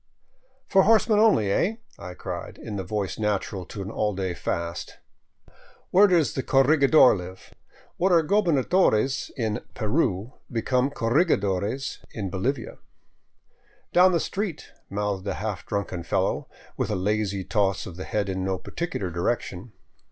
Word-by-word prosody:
For 190 - +5
horsemen 215 +1 +4
only, 195 - +4
eh? 200 - +1
" - - -29
I 90 - -9
cried, - - -6
in 105 - -7
the 95 - -3
voice 100 +1 -3
natural 100 -3 -1
to 100 - -6
an 100 - -6
all 105 -3 -1
day 95 -2 -2
fast. 85 -1 -4 0.9
"Where 200 +3 +7
does 165 - +2
the 130 - -1
corregidor 140 0 +5
live?" 95 0 -9 0.4
What 190 +2 +2
are 170 -2 +5
goberna 170 -6 +2
dores 135 - +2
in 110 -4 -2
Peru 110 - 0 0.2
become 125 +3 +1
corregidores 115 - 0
in 100 -4 -4
Bolivia. 120 +6 -3 1.1
"Down 185 +1 +6
the 170 - +2
street," 190 -4 -4 0.2
mouthed 100 -1 -2
a - - -1
half 100 -5 -4
drunken 100 -3 -3
fellow, 85 - -1 0.3
with - - -1
a - - 0
lazy 100 0 -1
toss 100 0 0
of 90 - -8
the 95 - -7
head 105 -2 -1
in 95 -1 -2
no 95 0 -1
particular 100 - -4
direction. 90 +3 -2
105 Hz, 150 wpm, -25 LUFS, 95-150 Hz, 1.1 s, Where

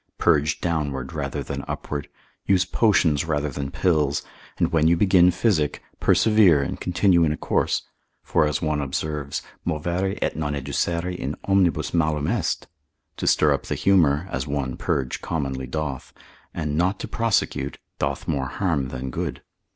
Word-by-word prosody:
Purge 75 -3 +2
downward 70 -6 -2
rather - - -3
than 70 0 -5
upward, 75 -1 -4 0.4
use 95 -1 +4
potions 90 -8 +3
rather 75 -2 -1
than 70 0 -4
pills, 75 -3 +1 0.3
and - - +1
when 80 -1 +3
you 85 +1 +4
begin 90 -2 +5
physic, 90 -5 +1 0.2
persevere 100 -10 +5
and - - -5
continue 90 -1 +3
in 80 - +2
a 75 - -2
course; - - 0 0.4
for 75 - +2
as 75 - -2
one 75 -2 0
observes, 70 +1 -3 0.2
movere 85 +4 -1
et - - -1
non 75 -2 -2
educere 85 +6 -1
in 70 -3 -4
omnibus 95 -3 +2
malum 75 -3 +1
est; - - -1 0.5
to - - -3
stir - - +4
up - - -4
the - - -1
humour 85 -4 +3
(as 65 +3 -3
one 70 -3 -2
purge 65 -3 -2
commonly 70 -5 -3
doth) 70 -2 -4 0.4
and 75 -1 -3
not 95 +5 +1
to - - -5
prosecute, 115 -3 0 0.2
doth - - -2
more 70 -4 -1
harm 80 -4 -1
than 65 0 -5
good. - - -4
75 Hz, 160 wpm, -24 LUFS, 70-90 Hz, 0.5 s, begin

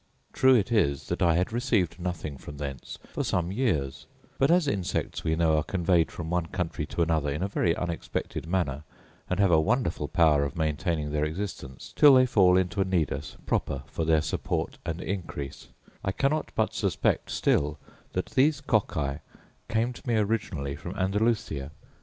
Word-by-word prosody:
True 130 0 +5
it 110 -1 +1
is 70 - +1
that - - -2
I 85 -2 +4
had 90 +6 0
received 110 - 0
nothing 85 -5 -4
from 75 - -9
thence 70 -3 -6 0.2
for - - -1
some 90 0 0
years: 95 - -1 0.3
but 135 - +4
as 175 -2 +4
insects, 100 -9 -2
we 80 -1 +1
know, 80 -1 +3
are 75 - +1
conveyed 85 -2 +1
from 80 -1 -6
one 90 -2 0
country 85 -4 -3
to 85 - 0
another 80 -3 +1
in 75 +5 -2
a - - +1
very 85 -4 +1
unexpected 85 -2 -4
manner, 80 -6 -1 0.5
and 90 - -1
have 100 -3 +4
a 80 -2 +5
wonderful 95 - 0
power 80 -5 +4
of 70 -1 -3
maintaining 80 -1 -1
their 75 0 0
existence 75 -5 -5
till 145 -2 +8
they 130 0 +6
fall 95 -7 +5
into 95 0 0
a - - +5
nidus 90 -6 -2
proper 70 0 -1
for 70 +4 -4
their 80 -1 +3
support - - -2
and 85 +1 -3
increase, 85 -8 -5 0.4
I 95 - 0
cannot 145 +6 0
but - - +1
suspect - - 0
still 75 +1 +1 0.4
that - - -1
these 145 +2 +3
cocci 80 - 0 0.5
came 115 +2 0
to 125 - -13
me 120 - +2
originally 100 -10 -1
from 85 +5 -7
Andalusia. 95 -7 0
85 Hz, 175 wpm, -27 LUFS, 75-105 Hz, 0.5 s, till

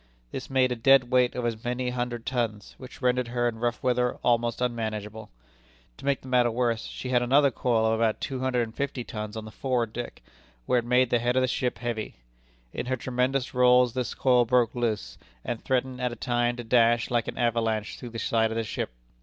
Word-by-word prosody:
This - - -6
made 130 -1 +2
a - - 0
dead 125 +1 +4
weight 125 -1 +3
of 125 -1 -2
as 115 -2 -3
many 125 +1 -2
hundred 120 -2 -3
tons, 115 -5 -2
which 130 +1 -11
rendered 125 0 +2
her 120 0 0
in 110 -2 -3
rough 120 0 -2
weather 125 -1 +1
almost 120 -1 +1
unmanageable. 110 -3 -3 0.7
To - - -11
make 140 -1 +1
the - - -12
matter 125 -2 +3
worse, 115 -1 -1
she 130 - -6
had 125 -1 +3
another 135 +3 +4
coil 115 -2 +1
of 110 - +2
about 115 -2 +1
two 135 -2 -4
hundred 130 -2 +1
and 110 -1 -7
fifty 140 0 -3
tons 105 -2 -6
on 110 - -6
the 110 - -9
forward 120 -3 -1
deck, 120 - -6 0.4
where 125 - +3
it 120 - -5
made 125 0 +3
the 120 - +3
head 120 +1 0
of 130 - +3
the - - +2
ship 125 0 -1
heavy. 120 -3 -4 0.6
In - - -4
her 130 0 0
tremendous 130 +2 -1
rolls, 125 -1 +5
this 125 -2 -3
coil 125 -2 +4
broke 120 -1 +2
loose, 110 - -2 0.3
and 115 - -4
threatened 130 0 -1
at 125 -1 0
a - - -6
time 120 0 0
to 120 - -6
dash 115 0 +3
like 120 -2 +1
an - - -5
avalanche 115 -3 0
through 120 - -7
the 115 - -7
side 110 0 +1
of 110 - -4
the 115 - 0
ship. 110 - -3
120 Hz, 220 wpm, -27 LUFS, 115-125 Hz, 0.7 s, rolls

